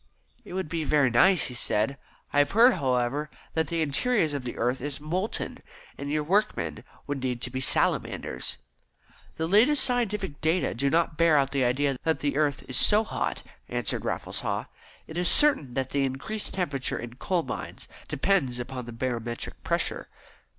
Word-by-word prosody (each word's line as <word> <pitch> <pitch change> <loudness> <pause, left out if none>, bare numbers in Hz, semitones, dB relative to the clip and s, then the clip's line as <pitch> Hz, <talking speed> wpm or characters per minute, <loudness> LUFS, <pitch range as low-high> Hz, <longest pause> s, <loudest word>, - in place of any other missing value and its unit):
"It - - -10
would 190 -3 -2
be 160 +1 -2
very 145 -4 +3
nice," 180 +9 +4
he 125 - -5
said. 115 +1 0 0.4
"I 145 - +4
have 145 - +2
heard, 240 +4 +7
however, 130 - 0 0.2
that 160 -1 0
the 165 +1 0
interior 155 - +1
of 140 - -4
the 120 - -6
earth 125 +2 0
is 145 +1 -4
molten, 180 +8 -3 0.4
and 140 - -6
your 150 0 0
workmen 200 +7 0 0.2
would 145 -2 -4
need 125 -2 -2
to 125 - -3
be 130 +1 -3
Salamanders." - - 0 0.8
"The 160 - -1
latest 245 - +5
scientific 210 - 0
data 160 +3 +1
do 140 +4 0
not 165 0 +1
bear 165 -2 +5
out 135 -1 +2
the 140 -2 +1
idea 135 +2 +1
that 160 0 +1
the 145 -1 -2
earth 145 -2 0
is 130 - +1
so 215 +1 +7
hot," - - -3 0.3
answered - - -2
Raffles - - -3
Haw. - - -2 0.4
"It 160 - -8
is 175 -1 +2
certain 265 - +4
that 130 -1 -2
the 140 -1 +1
increased 135 +12 -4
temperature 145 -8 -1
in 120 +1 -8
coal 180 +2 0
mines - - -6 0.2
depends 145 -12 +1
upon 125 0 -6
the - - -6
barometric 120 -1 -4
pressure. - - -1
145 Hz, 180 wpm, -27 LUFS, 130-180 Hz, 0.8 s, heard